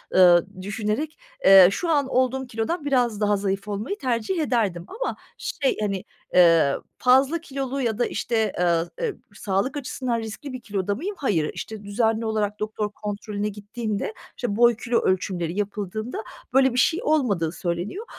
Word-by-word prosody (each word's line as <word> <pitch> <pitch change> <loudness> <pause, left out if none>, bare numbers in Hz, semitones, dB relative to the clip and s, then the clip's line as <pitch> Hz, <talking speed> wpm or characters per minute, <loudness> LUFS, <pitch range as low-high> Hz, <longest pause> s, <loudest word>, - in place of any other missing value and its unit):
ııı, 175 -2 +7 0.2
düşünerek, 215 +10 -2 0.3
eee, 190 -2 +10
şu 340 - -2
an 285 -4 +2
olduğum 260 0 +1
kilodan 250 +8 -2
biraz 245 -6 +1
daha 205 -1 +3
zayıf 195 +1 -2
olmayı 210 - -3
tercih 255 - -1
ederdim 210 - 0
ama - - -3 0.2
şey, 275 - -1
hani, 195 -3 -1 0.3
eee, 165 -5 +6 0.2
fazla 265 +6 +4
kilolu 275 -3 -3
ya 225 -4 0
da 240 - +3
işte, 220 -3 0
ııı, 170 -1 +2
eee, 450 -6 -1 0.2
sağlık 200 +9 -1
açısından 250 -3 -2
riskli 230 +5 -7
bir 255 - -6
kiloda 200 -2 -2
mıyım? 390 - -4
Hayır. 170 - +1
İşte, 220 -2 -7
düzenli 220 +2 0
olarak 210 -1 -1
doktor 215 0 -2
kontrolüne 205 0 -4
gittiğimde, 210 +1 -4 0.2
işte, 240 -5 -2
boy, 240 +1 +5
kilo 230 +2 0
ölçümleri 185 -1 -1
yapıldığında 210 +3 -3 0.3
böyle 265 -1 +4
bir - - -3
şey 330 +7 +3
olmadığı 210 - +1
söyleniyor 180 - -3
220 Hz, 155 wpm, -24 LUFS, 200-260 Hz, 0.3 s, eee